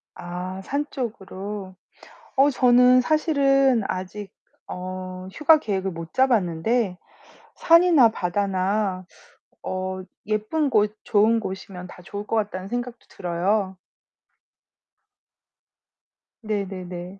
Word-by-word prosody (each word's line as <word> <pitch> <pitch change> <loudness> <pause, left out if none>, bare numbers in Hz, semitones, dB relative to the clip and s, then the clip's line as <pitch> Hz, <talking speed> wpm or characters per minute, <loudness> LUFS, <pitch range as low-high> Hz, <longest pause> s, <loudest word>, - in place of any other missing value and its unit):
아 180 +2 -6
산 285 +7 -2
쪽으로. 200 -5 -6 0.6
어 275 +2 +5
저는 250 -1 +5
사실은 275 -5 +3
아직 190 +2 -5 0.4
어 185 0 -6
휴가 310 +1 +5
계획을 195 -7 -2
못 165 -1 -8
잡았는데 220 -4 +1 0.6
산이나 335 -8 +5
바다나 190 0 -1 0.6
어 185 0 -3 0.2
예쁜 215 +9 0
곳, 210 -3 +2
좋은 220 +1 +3
곳이면 190 -3 -7
다 180 - -13
좋을 205 +3 -7
것 - - -1
같다는 195 -3 -2
생각도 245 +1 -5
들어요. 190 +2 -1 2.6
네네네. 190 -3 -5
205 Hz, 190 characters per minute, -24 LUFS, 185-245 Hz, 2.6 s, 어